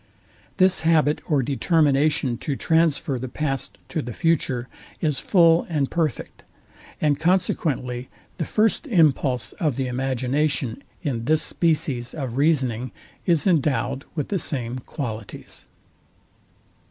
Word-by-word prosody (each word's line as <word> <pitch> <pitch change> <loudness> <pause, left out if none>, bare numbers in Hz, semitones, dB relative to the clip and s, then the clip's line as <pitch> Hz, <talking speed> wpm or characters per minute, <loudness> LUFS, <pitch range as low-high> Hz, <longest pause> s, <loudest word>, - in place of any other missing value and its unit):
This 185 -1 +4
habit 160 -2 +2
or 145 -4 +2
determination 145 -2 +2
to 140 - -2
transfer 160 -4 +1
the 130 - -4
past 135 0 -3
to 160 - -2
the 120 -3 -6
future 130 -6 0 0.3
is 150 -4 0
full 170 -3 +4
and 145 -5 0
perfect; 160 -6 -2 0.6
and 145 -2 +1
consequently 150 -8 0 0.3
the 165 - -2
first 220 - +1
impulse 145 - +2
of 150 -6 +1
the 135 - -1
imagination 130 +1 -1 0.2
in 120 -7 -2
this 155 +3 +2
species 140 -7 0
of 130 -6 -4
reasoning 130 -6 +1 0.4
is 170 -4 +3
endowed 145 -5 +1
with 150 - -2
the 195 - 0
same 130 -5 -3
qualities. 115 -5 -7
145 Hz, 120 wpm, -23 LUFS, 130-165 Hz, 0.6 s, This